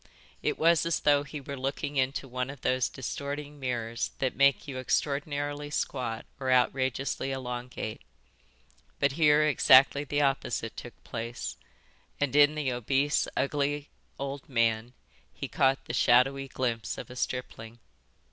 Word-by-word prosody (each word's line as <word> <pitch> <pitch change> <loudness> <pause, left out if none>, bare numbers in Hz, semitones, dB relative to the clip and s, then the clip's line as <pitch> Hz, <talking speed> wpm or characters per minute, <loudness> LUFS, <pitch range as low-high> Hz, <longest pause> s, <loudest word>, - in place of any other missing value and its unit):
It - - 0
was 165 0 +4
as 170 - 0
though 145 -1 +4
he 145 +1 -7
were 140 0 -6
looking 135 +2 -3
into 135 +1 0
one 125 +1 -3
of 140 -2 -9
those 130 -1 +1
distorting 145 +3 -5
mirrors 115 -3 -2
that 130 -2 -1
make 140 +1 +3
you 130 -2 -5
extraordinarily 145 +2 -1
squat 125 -6 -2
or 130 -1 -2
outrageously 130 +1 +1
elongate, 125 -3 -5 1.0
but 140 - +3
here 150 0 +4
exactly 140 -1 +6
the 145 0 -1
opposite 135 0 -1
took - - -10
place, 115 +2 -5 0.6
and 145 -1 0
in 145 +1 +6
the 145 -4 -1
obese, 135 +4 +1
ugly 145 +1 -1 0.3
old 140 +1 -5
man 115 -1 +1 0.4
he - - -6
caught 135 0 +1
the 120 - -5
shadowy 135 +3 +3
glimpse 120 -4 -2
of - - -8
a - - -9
stripling. 120 -2 -4
135 Hz, 140 wpm, -29 LUFS, 125-145 Hz, 1.0 s, exactly